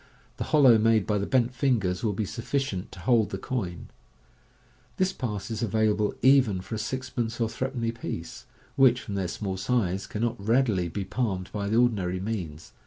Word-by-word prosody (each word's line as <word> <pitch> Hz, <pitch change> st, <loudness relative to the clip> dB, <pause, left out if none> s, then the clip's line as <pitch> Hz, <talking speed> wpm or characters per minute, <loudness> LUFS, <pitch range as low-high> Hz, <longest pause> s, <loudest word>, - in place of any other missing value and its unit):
The -, -, -3 dB
hollow 130 Hz, -7 st, +6 dB
made 110 Hz, -2 st, +3 dB
by 105 Hz, -1 st, 0 dB
the 100 Hz, -, -2 dB
bent 125 Hz, -1 st, +2 dB
fingers 115 Hz, -9 st, 0 dB
will 110 Hz, -3 st, +1 dB
be 105 Hz, +2 st, -2 dB
sufficient 115 Hz, -2 st, -3 dB
to 95 Hz, -, -10 dB
hold 115 Hz, +2 st, +3 dB
the 95 Hz, -, -4 dB
coin. 95 Hz, -6 st, -4 dB, 1.1 s
This 185 Hz, 0 st, +1 dB
pass 105 Hz, -4 st, -4 dB
is 110 Hz, -, -3 dB
available 110 Hz, -1 st, +1 dB
even 130 Hz, -8 st, +5 dB
for 95 Hz, -, -9 dB
a 110 Hz, -, -2 dB
sixpence 120 Hz, -2 st, -3 dB
or 115 Hz, -, +2 dB
threepenny 120 Hz, -1 st, -2 dB
piece, 85 Hz, -8 st, -7 dB, 0.3 s
which 130 Hz, -3 st, +5 dB
from 100 Hz, -, -7 dB
their 95 Hz, -2 st, -1 dB
small 95 Hz, +1 st, -4 dB
size, 95 Hz, -3 st, 0 dB
can 105 Hz, -, -4 dB
not 120 Hz, -3 st, -2 dB
readily 110 Hz, -5 st, +2 dB
be 95 Hz, +3 st, -4 dB
palmed 95 Hz, -3 st, -2 dB
by 100 Hz, -1 st, -3 dB
the 110 Hz, -, +2 dB
or 120 Hz, +1 st, +6 dB
dinary 95 Hz, -5 st, -2 dB
means. 90 Hz, -7 st, -5 dB
110 Hz, 185 wpm, -27 LUFS, 95-120 Hz, 1.1 s, hollow